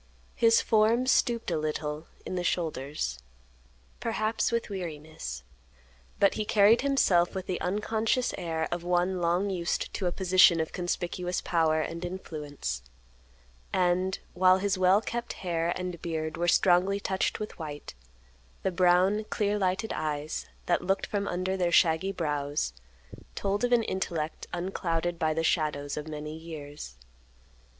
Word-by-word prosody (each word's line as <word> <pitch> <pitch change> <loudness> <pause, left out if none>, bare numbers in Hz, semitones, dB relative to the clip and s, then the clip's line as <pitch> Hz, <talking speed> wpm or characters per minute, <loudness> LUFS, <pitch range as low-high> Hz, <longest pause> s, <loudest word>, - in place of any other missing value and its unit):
His 230 0 +4
form 225 +3 +3
stooped 240 -5 +2
a 160 - +1
little 150 0 -3 0.2
in - - -4
the 180 -1 -1
shoulders, 145 - -2 0.8
perhaps 220 -1 0
with 235 0 0
weariness, 155 - -6 0.8
but 200 -1 +5
he 215 - -2
carried 210 +2 +5
himself 200 -11 +3
with 190 -1 -3
the 185 - -3
unconscious 220 +5 0
air 160 -2 -2
of 175 0 -2
one 180 +1 +1
long 175 +4 +1
used 175 -2 -2
to 190 - -1
a - - +1
position 185 -2 +5
of 160 - -2
conspicuous 180 0 -2
power 160 -2 +2
and 165 +2 -4
influence; 150 - -5 0.9
and, 185 +1 +1 0.2
while 185 +1 +5
his 200 0 0
well 185 +2 +4
kept 235 +1 -4
hair 170 -2 -1
and 180 -2 -5
beard 155 -2 -3
were 175 - -1
strongly 185 +3 +4
touched 190 +1 -1
with 215 -3 -6
white, 150 -2 -7 0.7
the 190 - +1
brown, 185 +4 +3
clear 210 0 0
lighted 190 +3 0
eyes, 155 0 -3 0.2
that 175 - +2
looked 195 +2 0
from 200 -1 -2
under 185 +2 -1
their 180 -2 0
shaggy 170 +2 +4
brows, 145 - -2 0.6
told 200 +2 -1
of 245 - +1
an 240 -2 +4
intellect 170 -6 -3
unclouded 175 -1 -2
by 155 -1 +2
the 165 +1 -1
shadows 150 -4 0
of 150 0 -5
many 150 0 -6
years. 150 - -8
175 Hz, 145 wpm, -28 LUFS, 160-195 Hz, 0.9 s, but